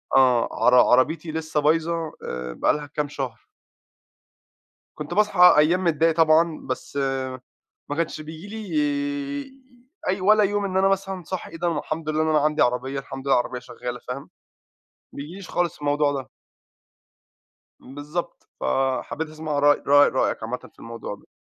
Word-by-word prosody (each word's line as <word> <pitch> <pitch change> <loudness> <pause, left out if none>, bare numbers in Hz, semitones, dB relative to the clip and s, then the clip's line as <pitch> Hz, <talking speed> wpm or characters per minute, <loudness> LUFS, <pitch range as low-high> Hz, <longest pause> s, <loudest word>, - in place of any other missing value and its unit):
آه 125 -3 +4 0.2
عر 125 - +6
عربيتي 155 +6 +3
لسه 160 -1 -2
بايظة 165 +1 +1
آآ، 60 0 -5
بقى - - +2
لها 150 -1 -4
كام 145 0 -2
شهر. 130 -5 -6 1.5
كنت 150 +3 -6
باصحى 200 -4 +6
أيام 170 +5 +3
متضايق 165 -1 +2
طبعًا، 160 0 +3
بس 130 +2 -5 0.9
ما 145 - -2
كانش 165 -2 -2
بييجي 160 +4 -9
لي 210 - -8 1.5
أي 190 +1 0
ولا 210 +3 +5
يوم 205 0 0
إن 190 -1 -1
أنا 190 +1 +4
مثلًا 195 -1 -1
صاحى 185 +3 -6
إيه 165 - -8
ده 170 -1 -1
الحمد 155 +1 -4
لله 155 0 +1
إن - - -1
أنا 155 -1 +4
عندي 150 +1 +1
عربية، 130 +3 +1
الحمد 135 0 -8
لله 135 - +4
العربية 125 +1 -3
شغّالة 125 0 -7
فاهم، 135 +2 -6 0.8
بييجيليش 175 +7 -8
خالص 175 -2 -1
الموضوع 145 0 +1
ده. 135 -2 -5 1.5
بالضبط، 150 +6 -6
فحبيت 135 +4 -1
أسمع 155 -1 -4
رأي 145 0 +4
رأي 145 +1 +6
رأيك 130 - 0
عامةً 120 +3 -3
في - - -36
الموضوع 115 -2 -7
ده. 100 - -18
155 Hz, 150 wpm, -24 LUFS, 135-170 Hz, 1.5 s, عر